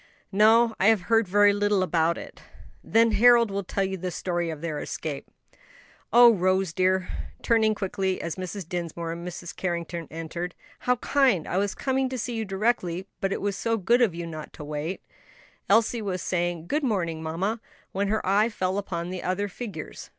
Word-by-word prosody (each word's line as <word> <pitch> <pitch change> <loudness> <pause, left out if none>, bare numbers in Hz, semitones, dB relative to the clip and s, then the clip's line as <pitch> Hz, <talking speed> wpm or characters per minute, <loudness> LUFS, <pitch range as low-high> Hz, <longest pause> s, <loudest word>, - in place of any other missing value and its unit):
"No, 225 +3 +5
I 195 - +4
have 220 -3 +5
heard 225 +1 +2
very 205 +2 +5
little 205 -1 +2
about 170 -2 +1
it." - - -10 0.4
"Then 230 0 +3
Harold 235 +1 +5
will 200 0 -2
tell 195 +2 -1
you 190 0 -2
the 185 +1 -3
story 175 -1 -2
of 160 -2 -5
their 155 -2 -3
escape. 145 -3 -5 0.8
Oh! 240 -1 +8
Rose 185 -2 +1
dear," 185 +1 +1 0.4
turning 220 -2 +3
quickly, 190 -2 -2
as 170 - -4
Mrs. 185 -1 -6
Dinsmore 170 -1 -4
and 170 +1 -6
Mrs. 175 -1 -7
Carrington 170 -2 -3
entered, 165 +2 -5 0.2
"how 250 - +2
kind! 250 - +2
I 180 - -1
was 200 0 0
coming 265 -1 0
to 260 - -4
see 245 +1 -3
you 225 -1 -2
directly, 190 -3 -1
but 195 - -1
it - - -2
was 200 -1 -1
so 230 +3 0
good 235 +5 +3
of 210 -8 +3
you 170 0 -4
not 155 -2 -8
to - - -9
wait." 150 +4 -4 0.7
Elsie 225 +3 +3
was 190 -3 -3
saying, 175 -2 -1
"Good 295 - -1
morning, 170 -10 -1
mamma," 185 +8 -2 0.3
when 200 +1 -1
her 215 +2 -1
eye 205 +4 +3
fell 190 -2 -1
upon 175 -3 -4
the 185 -1 -4
other 185 +3 -1
figures. 195 -6 -8
190 Hz, 185 wpm, -26 LUFS, 170-220 Hz, 0.8 s, Oh